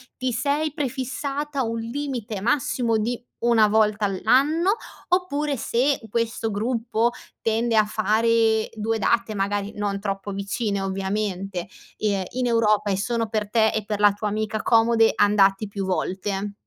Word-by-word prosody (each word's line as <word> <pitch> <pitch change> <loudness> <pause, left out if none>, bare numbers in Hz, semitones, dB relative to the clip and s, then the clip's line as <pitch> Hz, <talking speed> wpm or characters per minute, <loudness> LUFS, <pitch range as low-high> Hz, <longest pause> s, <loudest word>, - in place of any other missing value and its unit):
ti 255 -1 -2
sei 285 +5 0
prefissata 280 0 -3
un 230 0 -2
limite 235 -3 -4
massimo 235 0 +1
di 235 +3 -2 0.2
una 230 -2 +4
volta 210 0 +2
all'anno? 285 - +2 0.3
Oppure, 300 -6 0
se 260 +5 +1
questo 230 0 -1
gruppo 230 +2 0 0.3
tende 225 +1 +1
a 215 - +6
fare 220 +1 +2
2 225 +1 -1
date, 230 +1 +1
magari 200 +1 -1
non 205 -1 -2
troppo 195 0 -4
vicine, 200 +1 -2
ovviamente, 195 -1 -3 0.3
ehm, 200 -3 0
in 250 0 -1
Europa 215 -3 +2
e 195 - +1
sono 230 +3 -1
per 215 -1 -2
te 220 0 +3
e 215 - -2
per 210 -1 -3
la 205 -1 +5
tua 210 +1 -3
amica 215 +1 -2
comode, 225 0 +4
andati 205 0 +3
più 200 -1 -4
volte? 195 +2 -2
220 Hz, 145 wpm, -24 LUFS, 205-240 Hz, 0.3 s, a